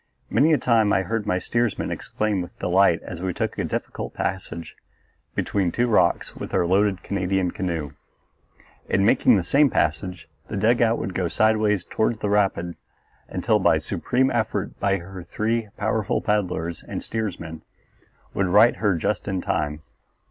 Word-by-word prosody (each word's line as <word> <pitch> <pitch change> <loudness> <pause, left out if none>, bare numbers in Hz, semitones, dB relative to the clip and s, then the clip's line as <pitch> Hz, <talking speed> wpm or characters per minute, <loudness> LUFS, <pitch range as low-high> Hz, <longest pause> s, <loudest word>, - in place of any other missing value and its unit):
Many 155 +4 +4
a 155 - +5
time 115 -5 +3
I 95 - +2
heard 110 +3 -3
my 90 - +2
steersman 120 +3 -1
exclaim 105 -3 -2
with 90 - -9
delight 90 -1 +3
as 85 -1 -7
we 95 -2 -2
took - - -2
a - - +1
difficult - - -4
passage 90 -3 -4 0.6
between 95 -4 0
two 120 - +1
rocks 90 -7 +2
with - - -5
our 85 - +3
loaded 95 +1 +2
Canadian 95 -2 0
canoe. 85 -6 -3 1.0
In 95 - +2
making 110 - +5
the 90 - 0
same 140 - +4
passage 85 +1 -1 0.2
the - - -4
dugout 115 +2 +3
would 95 - -4
go 90 -1 0
sideways 105 +1 +2
toward 110 0 0
the 105 - -1
rapid 95 -4 +1 0.5
until - - +1
by - - +4
a - - 0
supreme 130 +2 0
effort 110 -4 -1
her 95 -1 -1
three 110 +3 -2
powerful 110 0 0
paddlers 90 -6 -1
and - - -6
steersman 85 -8 -4 0.7
would 95 - +1
right 105 +6 +5
her 100 -4 +1
just 100 +6 -2
in 95 -2 -1
time. 75 -2 -2
95 Hz, 160 wpm, -24 LUFS, 90-110 Hz, 1.0 s, a